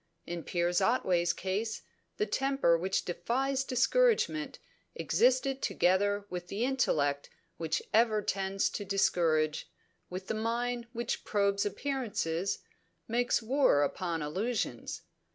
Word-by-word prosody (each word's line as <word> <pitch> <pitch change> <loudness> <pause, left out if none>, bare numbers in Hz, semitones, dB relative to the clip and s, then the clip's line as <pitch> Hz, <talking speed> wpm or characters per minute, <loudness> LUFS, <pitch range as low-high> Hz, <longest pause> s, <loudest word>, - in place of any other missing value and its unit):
In 170 -1 -5
Piers 175 +2 0
Otway's 185 -6 +2
case, 200 +5 -3 0.3
the 210 - +1
temper 270 -5 +2
which 185 +3 -1
defies 260 +10 -1
discouragement 255 - +2 0.4
existed 255 - +2
together 205 +3 +2
with 180 -2 -6
the 210 +6 -1
intellect 145 - 0 0.3
which 165 -1 -1
ever 220 -2 +3
tends 195 0 0
to 205 - -4
discourage, 165 -6 +1 0.4
with 185 +1 -6
the - - -2
mind 235 +2 -2
which 235 0 -3
probes 200 -1 +1
appearances, 205 -9 -2 0.4
makes 240 +1 +1
war 250 - +3
upon 165 +2 -2
illusions. 190 - -3
200 Hz, 115 wpm, -31 LUFS, 175-240 Hz, 0.4 s, ever